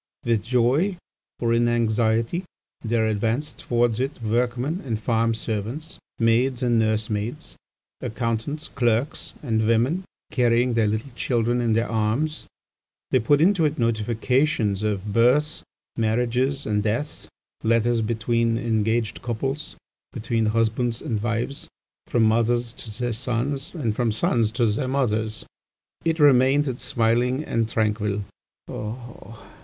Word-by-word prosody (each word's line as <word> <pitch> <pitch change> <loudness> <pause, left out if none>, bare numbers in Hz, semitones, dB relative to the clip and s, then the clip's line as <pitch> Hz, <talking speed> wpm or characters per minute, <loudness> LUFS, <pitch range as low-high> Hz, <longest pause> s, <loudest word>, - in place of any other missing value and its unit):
"With 115 -3 +2
joy, 130 - +2 0.4
or 115 -1 +1
in 120 0 +3
anxiety, 115 +5 +1 0.4
there 115 -1 +1
advanced 115 +7 -1
towards 120 -1 +1
it 135 +2 -2
workmen 125 - 0
and 115 -5 -2
farm 115 0 +1
servants, 115 +8 -4 0.2
maids 120 +3 +2
and 120 -2 +3
nursemaids, 110 +3 -1 0.5
accountants, 115 +6 -2
clerks, 120 +3 -1
and 110 -5 +1
women 125 +11 +2 0.3
carrying 120 0 +2
their 115 -2 +2
little 110 +6 -2
children 120 0 0
in 115 -2 +1
their 115 +1 +1
arms; 115 +8 -1 0.6
they 130 - +4
put 145 +6 +3
into 180 0 +4
it 150 - +1
notifications 115 0 +1
of 105 -1 -2
births, 130 +7 +3 0.3
marriages, 125 +5 0
and 105 -1 +1
deaths, 115 +8 -2 0.4
letters 115 +1 +2
between 115 +1 0
engaged 115 -1 0
couples, 135 +6 -3 0.4
between 115 0 0
husbands 115 +2 0
and 110 -3 -2
wives, 120 +4 -2 0.4
from 120 - +2
mothers 115 +2 +2
to 110 -2 -9
their 120 -1 -1
sons, 135 - -2
and 115 -10 -1
from 120 -1 +1
sons 110 +1 +1
to 120 0 +2
their 110 +5 0
mothers. 110 -5 -1 0.6
It 165 -1 +1
remained 135 -2 +4
smiling 120 +4 +1
and 115 -6 -1
tranquil. 105 -2 0
115 Hz, 125 wpm, -24 LUFS, 110-130 Hz, 0.6 s, they